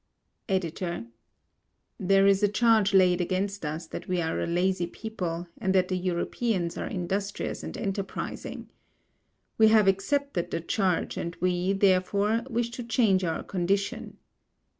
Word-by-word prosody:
EDITOR: 175 -6 -2 0.9
There 195 +1 +4
is 195 0 +4
a 205 - +5
charge 215 -1 +3
laid 185 -2 +4
against 195 +2 -2
us 155 +2 -4
that - - -8
we 180 -1 0
are 160 -1 -1
a - - -1
lazy 175 +1 +1
people, 175 -4 -5
and 190 0 0
that 185 -1 +3
the 185 - 0
Europeans 180 +1 -1
are - - -4
industrious 195 +1 -3
and - - -6
enterprising. 195 -2 -4 0.9
We 220 - +8
have 215 -2 +5
accepted 195 +2 0
the - - -2
charge 185 0 0
and 170 0 -4
we, 180 +1 +1
therefore, 200 +4 +2
wish 235 -1 -1
to 245 +1 -6
change 225 -5 +2
our 165 -2 -2
condition. 200 +4 -2
190 Hz, 140 wpm, -27 LUFS, 180-210 Hz, 0.9 s, We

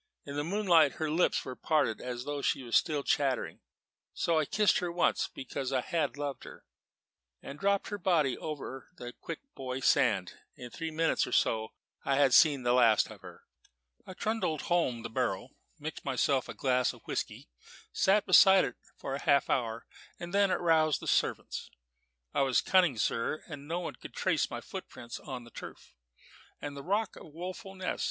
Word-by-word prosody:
In 140 - -7
the 145 - -1
moonlight 170 -4 +4
her 155 -1 -2
lips 170 +3 +2
were 130 - -6
parted 150 -8 0
as 125 -1 -5
though 145 +1 -4
she 135 - 0
were 120 - -10
still 150 +2 +2
chattering; 135 -4 0 0.6
so 165 -2 +2
I 155 - +1
kissed 210 +6 +3
her 175 -1 -2
once, 175 0 +1
because 130 0 -5
I 130 -2 +1
had 150 0 -1
loved 145 -1 -4
her, - - -12 0.8
and 140 +2 -8
dropped 200 +2 +1
her 205 -1 -4
body 160 -8 +2
over 140 -4 -6
into - - -12
the 120 0 -6
Quick 165 - -7
Boy 130 -1 -4
Sand. 105 -8 +2 0.2
In 125 -1 -9
three 165 +4 -4
minutes 160 +1 +1
or - - -7
so 110 -1 +1 0.3
I 140 - +1
had 135 -2 +4
seen 145 -4 +6
the 120 0 +3
last 115 -4 +4
of - - -12
her. - - -12 0.6
"I 185 - -10
trundled 215 -9 -1
home 130 -10 0
the - - -5
barrow, 120 -3 -1 0.3
mixed 155 0 -6
myself 135 0 +1
a - - -6
glass 125 -2 +1
of - - -17
whisky, - - -4 0.5
sat 200 +2 +3
beside 190 +1 +7
it 125 - -6 0.2
for 135 - -4
half 140 -2 +3
an - - +4
hour, 115 -2 -4 0.3
and 175 +1 -7
then 200 -1 +4
aroused 160 -5 +3
the - - -7
servants. - - 0 0.6
I - - +2
was 135 -2 +3
cunning, 180 -9 +3
sir; 115 +7 -1
and 145 -2 -9
no 170 +2 -2
one 175 - -4
could - - -11
trace - - +1
my - - -5
footprints 120 0 -8
on 130 -4 -7
the 120 - -15
turf - - -10 0.7
and 145 -1 -6
rock 205 +1 0
of - - -11
Woeful 185 +5 -7
Ness. 185 -1 -3
145 Hz, 185 wpm, -31 LUFS, 130-170 Hz, 0.8 s, beside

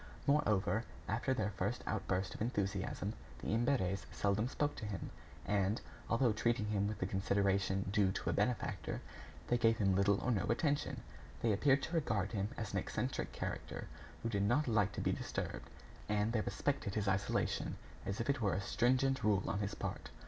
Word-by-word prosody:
Moreover, 110 -7 +3 0.2
after 115 +5 0
their 110 -5 +1
first 100 +5 -2
outburst 95 -2 -1
of - - -9
enthusiasm, 100 -3 -1 0.2
the - - -5
Imberts 110 -4 +1
seldom 105 +3 +1
spoke 145 +2 -1
to - - -5
him, 95 -4 -4 0.3
and, 100 +2 +1 0.3
although 115 -1 +3
treating 115 0 +1
him 100 -1 +1
with 105 - -3
the - - -1
consideration 95 0 +1
due 100 -3 +4
to - - -1
a - - 0
benefactor, 125 -2 -1 0.5
they 120 - +2
gave 115 -1 +4
him 100 -4 +3
little 100 +1 +3
or 125 - +1
no 100 -5 +1
attention. 145 +5 0 0.4
They 115 -2 +4
appeared 135 +6 +4
to 165 - -4
regard 105 - +1
him 100 -2 -1
as 110 -3 -4
an - - +2
eccentric - - -2
character - - -4 0.4
who 115 - 0
did 100 -3 0
not 120 +9 +3
like 105 -3 +3
to - - -3
be - - +2
disturbed, - - -3 0.4
and 105 +1 +2
they 110 - +2
respected 135 -5 -1
his 105 -2 0
isolation 95 +1 0 0.3
as 95 +2 -3
if 115 - -1
it 140 -2 +1
were 100 -3 +2
a - - 0
stringent 130 +4 +2
rule 100 -3 +3
on 100 - 0
his 100 -1 -2
part. - - -4
105 Hz, 185 wpm, -36 LUFS, 100-120 Hz, 0.5 s, due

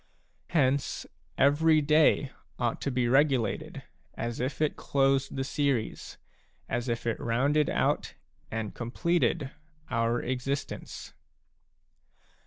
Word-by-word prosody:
Hence, 140 -4 +1 0.3
every 155 +3 +4
day 150 -2 +3 0.3
ought 120 -2 -1
to - - -1
be 125 -2 0
regulated 130 -4 +1 0.3
as 120 0 -4
if 130 +3 -2
it 155 -1 +1
closed 135 -1 +1
the 135 - -1
series, 135 -4 -2 0.5
as 120 +1 -2
if 115 0 -2
it 115 - -1
rounded 140 +6 +2
out - - 0 0.3
and 110 -2 -4
completed 155 +3 0 0.4
our 115 0 +1
existence. 130 +2 -4
135 Hz, 105 wpm, -29 LUFS, 120-145 Hz, 0.5 s, every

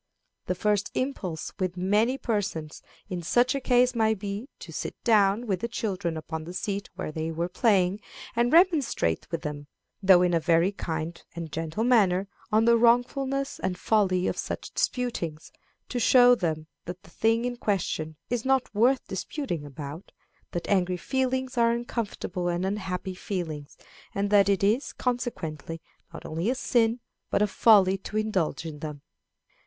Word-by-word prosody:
The 180 - 0
first 205 +2 +1
impulse 185 - -3
with 185 -1 -2
many 210 +8 +2
persons 195 - -3 0.3
in 180 -2 -4
such 245 +9 +2
a 275 - -2
case 250 0 +3
might 220 -2 +2
be 205 +6 -5
to - - -10
sit - - -4
down 210 0 +3
with 195 -5 -1
the 235 - -2
children 190 -8 -2
upon 160 0 -5
the 175 +2 -8
seat 200 +1 -3
where 185 -4 -4
they 160 +1 -3
were 165 +1 -2
playing, 195 -1 +2 0.4
and 240 +1 +2
remonstrate 315 - +3
with 165 - -4
them, 145 -1 -5 0.3
though 190 -2 +6
in 175 -1 +2
a 165 - +4
very 165 +3 +3
kind 165 -3 -4
and 165 -2 -6
gentle 165 +7 -2
manner, 200 -6 +3 0.2
on 220 +1 +4
the 235 0 +6
wrongfulness 260 +4 +2
and 185 -1 -2
folly 185 -3 +2
of - - -1
such - - -5
disputings, 175 -11 -2 0.4
to 245 - -2
show 245 0 +7
them 160 -8 -1 0.2
that 180 +1 -7
the - - -16
thing 225 +5 +1
in 245 0 -2
question 180 -8 -2
is 240 -2 -2
not 265 -3 +1
worth 245 +5 +3
disputing 190 - -4
about, 145 +4 -8 0.4
that 175 - -4
angry 185 -2 +2
feelings 260 +3 -1
are 230 0 +4
uncomfortable 215 -6 -3
and 175 +1 0
unhappy 190 -2 -3
feelings, 160 -7 -5 0.4
and 200 +1 -1
that 200 -1 +5
it 195 -1 +2
is, 225 +8 +1
consequently, 165 - -3 0.3
not 165 - -10
only 165 +7 -2
a 255 - +1
sin, 235 -2 +2 0.3
but 205 - +2
a - - +5
folly 195 -2 +5
to 210 - -5
indulge 195 -7 -1
in 155 -2 -6
them. 150 -2 -7
200 Hz, 165 wpm, -27 LUFS, 170-235 Hz, 0.4 s, show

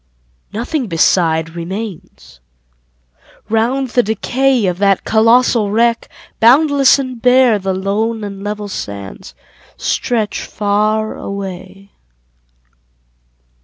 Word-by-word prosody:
Nothing 245 +4 -3
beside 165 -2 +1
remains. 175 - -8 1.1
Round 245 +4 0
the 245 - +2
decay 245 +3 0
Of 180 -1 -1
that 195 -1 +2
colossal 230 -1 +3
wreck, 230 +2 +1 0.3
boundless 275 +3 +5
and 255 -4 -5
bare 250 -3 +4
The 190 -1 -2
lone 215 +4 -2
and 200 -1 -7
level 210 0 -4
sands 100 - -8 0.4
stretch 220 -4 -2
far 215 +1 -1
away. 195 0 -8
215 Hz, 90 wpm, -16 LUFS, 195-240 Hz, 1.1 s, boundless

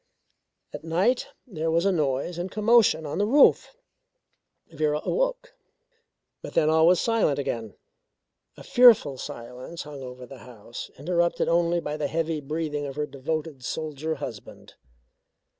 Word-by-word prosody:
At - - -7
night 185 +10 +1 0.2
there 165 -8 -3
was 165 +3 +1
a 200 - +4
noise 150 +1 -1
and 180 +2 -3
commotion 215 -6 +3
on 150 +4 -4
the 205 - +2
roof. 285 - +4 1.0
Vera 150 -1 0
awoke, - - -1 0.9
but - - -9
then 155 0 +3
all 160 +1 +5
was 180 -1 +5
silent 225 -11 +1
again. 115 -6 -4 0.8
A - - -11
fearful 225 - +5
silence 125 +7 -8
hung 145 -2 -9
over 125 -1 -9
the 130 +1 -12
house, 120 -1 -10
interrupted 170 +3 0
only 170 0 +2
by 150 -2 -4
the 150 -2 -1
heavy 160 +1 -2
breathing 150 0 -3
of 135 - -7
her 150 0 -1
devoted 150 0 -5
soldier 155 +1 -4
husband. 120 -7 -9
160 Hz, 140 wpm, -25 LUFS, 140-175 Hz, 1.0 s, all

